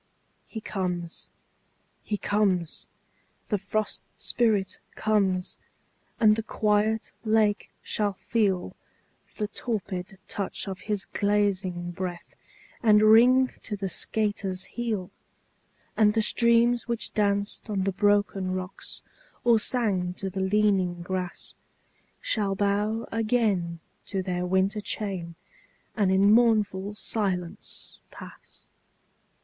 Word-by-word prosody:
He 220 - -7
comes, 180 -5 -4 0.7
he 210 - -2
comes, 195 -6 0 0.6
the 205 - +1
Frost 215 +2 -2 0.2
Spirit 210 -6 +1 0.2
comes 195 -4 0 0.6
and 215 -2 +6
the 225 - -1
quiet 215 0 +1
lake 215 -2 +2
shall 205 -2 0
feel 195 -2 0 0.6
The 210 - -1
torpid 195 -4 -4
touch 200 0 -3
of 190 -2 -5
his 205 -2 0
glazing 195 -4 0
breath, 175 -1 -6 0.5
and 215 -2 +5
ring 245 +4 +6
to 210 - -4
the 195 -1 -3
skater's 205 -3 -1
heel; 220 -6 -3 0.8
And 210 -1 +4
the 220 - +3
streams 235 +1 +3
which 235 -2 -2
danced 205 +1 0
on 195 -3 0
the 195 - +1
broken 205 -2 +2
rocks, 185 +1 -5 0.4
or 235 -2 +5
sang 195 -7 0
to 195 0 -3
the 190 - -4
leaning 190 -3 +2
grass, 185 0 -4 0.7
Shall 200 -3 0
bow 205 +3 0
again 215 -7 +1 0.3
to 190 -2 -2
their 180 -1 -2
winter 190 +3 +1
chain, 190 -6 -3 0.6
and 200 -4 +2
in 195 +2 +5
mournful 210 -4 +3
silence 190 -4 -3
pass. - - -11
205 Hz, 110 wpm, -27 LUFS, 185-215 Hz, 0.8 s, and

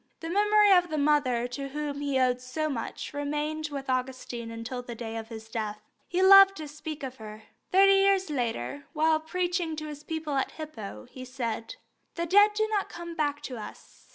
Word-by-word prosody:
The 330 0 -5
memory 415 +1 +5
of 355 -1 +4
the 310 - -2
mother 285 -5 +2
to 275 +3 -5
whom 290 0 -4
he 280 -2 0
owed 250 -1 +2
so 260 +5 -2
much 255 -7 -5
remained 300 +2 -2
with 275 -1 -5
Augustine 255 -2 -3
until 230 +2 -5
the 245 -1 -8
day 225 -1 -6
of 225 -1 -5
his 220 -1 -9
death. 215 -2 -4 0.3
He 360 +1 +1
loved 390 0 +9
to 310 - -6
speak 305 0 -7
of 260 -1 -6
her. 215 0 -10 0.3
Thirty 390 +1 +6
years 390 -3 +3
later, 245 - -3
while 315 0 +3
preaching 350 0 -2
to 310 0 -5
his 295 -1 -7
people 320 -2 -4
at 265 - -1
Hippo, 275 -10 -8
he 255 - -9
said: 245 - -4 0.4
"The 340 - -1
dead 410 +4 +5
do 435 0 +1
not 410 -2 0
come 340 0 -7
back 290 -2 -1
to 255 -4 -6
us. 215 - -11
290 Hz, 195 wpm, -28 LUFS, 250-335 Hz, 0.4 s, loved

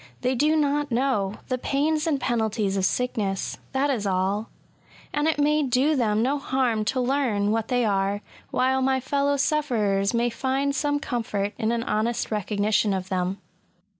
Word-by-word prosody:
They 255 +1 +1
do 300 +5 +2
not 295 -1 +1
know 230 -5 0
the 255 -1 -1
pains 300 +5 0
and 295 -4 +1
penalties 220 -5 0
of 190 -1 +1
sickness— 205 -5 -1
that 280 +2 +1
is 215 -6 -1
all: 195 +3 0 0.6
and 295 +1 +1
it 320 - +1
may 300 +1 +3
do 275 +3 +2
them 220 -4 +1
no 280 +3 +1
harm 255 -5 0
to 260 +4 0
learn 245 -6 +1
what 225 0 0
they 245 -2 +1
are, 200 0 0 0.3
while 265 +1 +1
my 265 0 +2
fellow 280 +2 0
sufferers 225 -10 +1
may 240 0 +1
find 270 +3 -1
some 290 +1 0
comfort 220 -7 -2
in 220 +1 +1
an 235 -1 -1
honest 225 +2 -1
recognition 210 0 +1
of 190 0 -4
them. 185 0 -1
245 Hz, 165 wpm, -25 LUFS, 210-275 Hz, 0.6 s, may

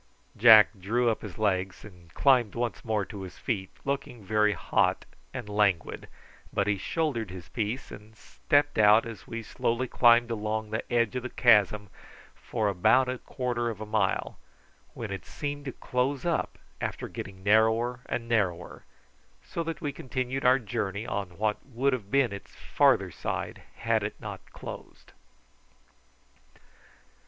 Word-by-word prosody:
Jack 110 -1 +8
drew 115 +5 +1
up 110 - -4
his 100 -5 -8
legs 95 -3 -1
and 90 -5 -15
climbed 125 -7 +3
once 120 0 -2
more 110 -3 0
to 100 -2 -8
his 95 -2 -9
feet, 95 -6 -3 0.2
looking 135 -5 -3
very 105 +1 +3
hot - - +1 0.3
and 110 - -6
languid, 105 -5 0 0.4
but 100 - +1
he 105 0 +2
shouldered 115 - -1
his 90 -5 -9
piece 110 - -3
and 110 +1 -12
stepped 145 +3 0
out 105 +2 +6
as 115 -3 -9
we 115 0 -5
slowly 120 +3 -1
climbed 120 -1 +5
along 110 0 -2
the 110 - -4
edge 120 0 +2
of 125 - -1
the 130 - -5
chasm 105 -4 +4 0.5
for 110 -3 -2
about 100 +7 +4
a 125 0 -3
quarter 120 -3 -2
of 110 -3 -6
a 110 - -5
mile, 110 0 -1 0.6
when 110 -4 -5
it 95 - -5
seemed 145 0 -5
to 135 - -3
close 125 +4 -2
up 170 -2 -1 0.2
after - - -3
getting 95 -1 -8
narrower 110 +4 +3
and 115 -1 -3
narrower, 95 -7 -1 0.6
so 170 - -4
that 165 -2 -4
we 145 - -2
continued 130 +1 -3
our 125 +1 +6
journey 110 -3 -3
on 100 -6 -4
what 105 0 -1
would 135 +1 0
have 110 -6 -4
been 130 -3 +2
its 100 - -10
farther - - +2
side - - -4
had - - +1
it - - -5
not - - -7
closed. - - -10
110 Hz, 155 wpm, -28 LUFS, 105-125 Hz, 0.6 s, Jack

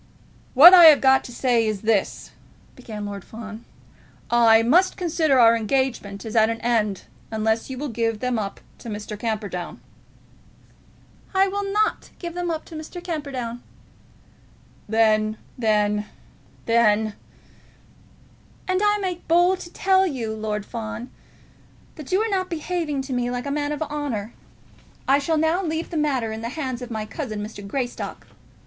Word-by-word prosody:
"What 330 +8 +11
I 350 -2 +10
have 310 -3 +9
got 265 0 +4
to - - -9
say 240 -2 +1
is 210 -3 -2
this," 215 -3 0 0.4
began 215 -5 -7
Lord 200 -2 -6
Fawn; 220 0 -10 0.7
"I 230 -1 +5
must 350 +11 +3
consider 315 -6 +1
our 230 -1 +7
engagement 230 -4 -2
as 220 - -6
at 220 0 +5
an 230 0 -3
end 215 -5 0 0.3
unless 220 +1 -1
you 260 - -6
will 295 +3 -4
give 225 -3 -2
them 250 -1 -1
up 200 -2 -5 0.2
to 235 - -9
Mr. 210 0 -6
Camperdown." 210 -5 -4 1.6
"I 385 +1 +4
will 400 0 -3
not 430 +1 0
give 340 -2 -6
them 350 0 -3
up 320 -1 -3
to 325 - -11
Mr. 320 +3 -8
Camperdown." 275 -8 -5 1.3
"Then, 215 -1 +2 0.2
then, 210 -2 +1 0.6
then, 220 -2 +3 0.7
" - - -29
"And 370 +1 +1
I 415 0 +3
make 370 -3 -4
bold 350 +3 +3
to 345 - -9
tell 380 0 +2
you, 240 -8 -3
Lord 215 -1 -3
Fawn, 230 +2 -6 0.8
that 305 -1 -10
you 375 - +3
are - - -1
not 375 -2 -1
behaving 320 -4 -3
to 265 -1 -5
me 245 -1 -1
like 245 +1 -4
a 280 - -3
man 290 0 -1
of 300 +1 -2
honour. 285 -8 -4 0.7
I 275 +1 +4
shall 315 +3 0
now 320 +4 +1
leave 320 0 -3
the - - -5
matter 270 -7 0
in 220 0 -6
the 230 - -4
hands 260 -3 -4
of 245 - -7
my 220 -2 -4
cousin, 215 -4 -5
Mr. 215 -1 -9
Greystock." 245 +3 -4
245 Hz, 160 wpm, -23 LUFS, 220-315 Hz, 1.6 s, What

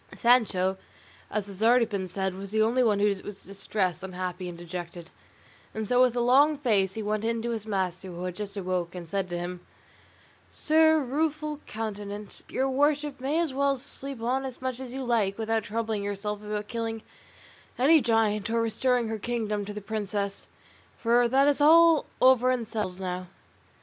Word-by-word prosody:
Sancho, 200 -6 +3 0.5
as 210 -1 -2
has 200 -2 -10
been 220 - +3
already 225 -6 +2
said, 190 +1 -2
was 195 +1 -7
the 220 +2 +1
only 235 +4 +2
one 215 -4 +3
who 200 - +2 0.2
was 205 -1 -9
distressed, 195 -2 -2
unhappy, 180 -1 -5
and 170 - -8
dejected; 175 0 -7 0.6
and 220 -1 -3
so 250 +2 +3
with 250 -2 +4
a 240 - +1
long 280 +5 +5
face 205 -8 +1
he 220 - -3
went 210 +1 -1
in 230 0 0
to 235 - -1
his 220 -2 -4
master, 190 -2 -2
who 175 -1 -7
had 180 -1 -4
just 205 +1 -6
awoke, 180 -2 -2
and 175 -2 -7
said 195 +1 -2
to 175 - -3
him: 175 +1 -5 0.9
"Sir 315 0 +4
Rueful 300 +2 -2
Countenance, 210 -2 -5
your 265 - 0
worship 290 +1 +1
may 280 +4 0
as 330 -5 0
well 275 0 +1
sleep 270 +1 -7
on 260 +3 0
as 260 -2 -6
much 260 -1 -3
as 260 -2 -7
you 265 +1 -4
like, 220 -5 +1
without 225 -1 -1
troubling 220 -1 -2
yourself 205 +1 -3
about 210 0 -4
killing 225 -1 -4 0.7
any 300 +5 +5
giant 225 -2 +1
or 230 0 +1
restoring 235 +2 +1
her 220 0 -3
kingdom 215 -3 -2
to 210 - -6
the 210 0 -6
princess; 200 -1 -3 0.5
for 240 +1 +3
that 270 +3 +4
is 290 0 +2
all 330 +1 +6
over 255 -1 +5
and 245 -3 0
settled 205 -5 -4
now." 180 -1 -4
220 Hz, 185 wpm, -27 LUFS, 195-255 Hz, 0.9 s, all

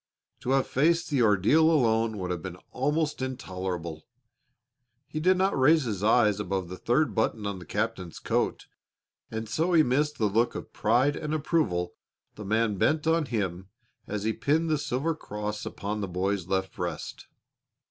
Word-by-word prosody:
To - - -5
have 135 -1 +3
faced 165 +5 +1
the 140 -4 +2
ordeal 110 - +4
alone 115 -7 +2
would 90 -2 -3
have 90 -2 -3
been 90 0 -7
almost 150 +2 0
intolerable. 90 -10 -4 1.0
He 155 - -4
did 185 +4 +3
not 190 +1 +2
raise 150 +4 +5
his 105 -5 -3
eyes 105 -2 +4
above 95 -3 -2
the 90 - -6
third 135 +10 +1
button 110 -1 0
on 100 -2 -3
the 90 - -12
captain's 105 -6 -3
coat, - - -1 0.6
and 110 0 -4
so 165 +10 0
he 160 -2 +6
missed 150 +4 +1
the 110 - +1
look 110 +4 +1
of - - -7
pride 140 +4 +2
and 150 0 -3
approval 100 - 0 0.4
the 105 - -9
man 110 -1 0
bent 155 0 +2
on 160 -1 +2
him 95 -6 -2 0.4
as 105 -1 -3
he 110 +1 +1
pinned 155 +8 +1
the 155 - +2
silver 145 +4 -1
cross 105 -7 -5
upon 105 +1 -4
the 100 - -2
boy's 95 0 -1
left 95 0 -1
breast. - - -5
110 Hz, 170 wpm, -27 LUFS, 95-150 Hz, 1.0 s, he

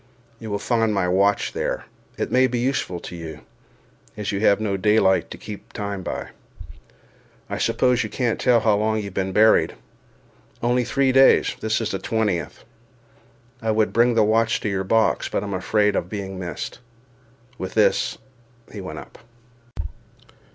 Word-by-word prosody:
You 110 - -7
will 100 - -1
find 115 +1 +1
my 95 -2 +1
watch 100 +3 +2
there—it - - -5
may 130 +1 +4
be 125 - -2
useful 120 -8 -1
to 90 - -8
you, 80 -3 -8 0.8
as 105 -1 -3
you 100 - -2
have 100 -1 +4
no 105 -2 -1
daylight 95 -1 +3
to - - -8
keep 105 -1 -10
time 100 -2 -4
by. - - -5 1.2
I - - -2
suppose 125 -1 +2
you 110 - -5
can't 120 +1 -1
tell 120 -3 +4
how 105 -2 +3
long 110 +1 +1
you 110 - -2
have 100 -2 -7
been 95 0 -1
buried—only 110 - 0
three 135 +1 +2
days—this 130 -4 +4
is 115 - -2
the 95 - -3
twentieth. 105 -4 -2 1.0
I 115 - -2
would 110 0 +1
bring 120 +1 +3
the 110 - +5
watch 110 +1 +2
to 105 - -1
your 95 -1 -1
box, 110 +3 +1
but - - -2
am 100 -1 -4
afraid 105 +2 +1
of 90 - -2
being 95 -2 -5
missed." 90 -2 -6 0.8
With 95 - -5
this - - +2 0.6
he 105 - -6
went 80 -4 -7
up. - - -11
105 Hz, 160 wpm, -23 LUFS, 95-115 Hz, 1.2 s, the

